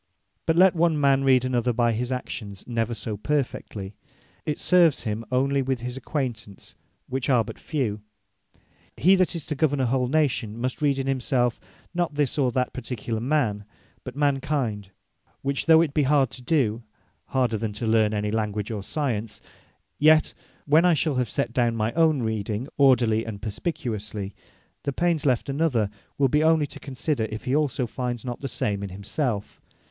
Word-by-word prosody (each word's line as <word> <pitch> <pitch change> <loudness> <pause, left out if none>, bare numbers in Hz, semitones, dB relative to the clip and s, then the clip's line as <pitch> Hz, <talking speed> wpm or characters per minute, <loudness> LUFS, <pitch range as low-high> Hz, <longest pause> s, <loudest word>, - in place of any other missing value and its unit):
But 160 - +3
let 185 +1 +6
one 165 -2 +2
man 135 -1 +3
read 130 -2 +4
another 125 -1 +1
by 120 0 +2
his 120 +3 -2
actions 105 -6 -5
never 115 -1 -1
so 105 -1 -5
perfectly, 110 -6 -3 0.5
it 150 - -1
serves 175 -5 +4
him 110 0 -3
onely 135 +2 +2
with 130 -2 -1
his 125 +1 -4
acquaintance, 125 -8 -5 0.3
which 130 +1 -2
are 125 -4 +4
but - - -9
few. 120 -10 -2 1.0
He 185 - +5
that 185 -1 +1
is 165 - -4
to 155 - -2
govern 145 -1 +1
a 130 - +2
whole 125 +1 +1
Nation, 130 -7 0
must 130 +4 -3
read 140 -2 +2
in 135 - -2
himselfe, 125 -2 0 0.3
not 175 -4 -1
this, 145 -1 0
or 130 -3 +2
that 125 +1 -1
particular 125 -1 -4
man; 120 -5 0 0.4
but - - -8
Man 145 -1 +2
kind; 120 -9 -2 0.5
which 140 +3 -1
though 160 0 +7
it 155 -4 0
be 150 - +2
hard 135 -2 +3
to 125 - -8
do, 125 -5 +1 0.4
harder 125 -5 0
than 110 -1 -3
to 110 +3 -4
learn 110 -1 +3
any 105 -1 -1
Language, 105 -1 -2
or 105 -2 -3
Science; 115 -3 -2 0.6
yet, 155 +1 +5 0.3
when 155 +3 +5
I 180 -2 +5
shall 155 0 0
have 125 -4 0
set 115 - -2
down 120 -2 +2
my 110 +1 -1
own 160 -5 +3
reading 110 +2 -2
orderly, 120 -5 +4
and 110 -3 -6
perspicuously, 105 - -4 0.5
the 140 - -3
pains 170 -1 +1
left 125 -3 +1
another, 135 -8 +1 0.3
will 140 - +4
be 150 +4 +2
onely 160 -1 +4
to - - -10
consider, 135 -2 -2
if 110 0 -6
he 130 - 0
also 145 -4 +1
find 120 0 -4
not 120 -1 -4
the 135 - -4
same 105 -5 -2
in 100 - -4
himselfe. 105 +3 -3
125 Hz, 180 wpm, -25 LUFS, 110-145 Hz, 1.0 s, though